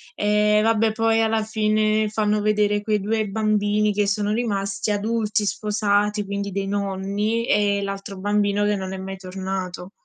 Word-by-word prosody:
Ehm, 210 0 +3
vabbè 225 0 +3
poi 225 0 +2
alla 225 0 +1
fine 215 0 +1
fanno 210 0 0
vedere 210 0 +2
quei 210 0 0
2 215 +1 -1
bambini 210 0 +1
che 205 0 +1
sono 205 +1 0
rimasti 200 -3 -1
adulti, 215 0 0
sposati, 210 0 0
quindi 200 0 -4
dei 195 +1 -2
nonni 200 +3 -1
e 205 -1 +2
l'altro 195 0 -5
bambino 205 +1 +1
che 205 0 +2
non 190 -1 -5
è - - -5
mai 190 +1 -6
tornato. 185 -1 -5
210 Hz, 155 wpm, -23 LUFS, 200-215 Hz, -, Ehm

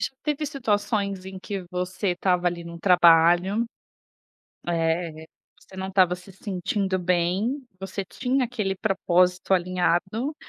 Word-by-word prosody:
já - - -1
teve 300 0 -1
situações 205 -7 -1
em 190 0 -8
que 195 -1 -5
você 180 +2 -2
estava 180 0 +1
ali 170 -1 -1
num 170 0 -8
trabalho, 175 +4 +5 1.0
eh, 165 -1 -1 0.4
você 190 - -16
não 190 0 -4
estava 185 -2 +3
se 180 +2 -14
sentindo 190 0 -2
bem, 185 +10 0
você 190 +1 -5
tinha 255 +8 -1
aquele 210 -5 -2
propósito 185 -2 +1
alinhado, 185 - 0
185 Hz, 125 wpm, -25 LUFS, 175-205 Hz, 1.0 s, trabalho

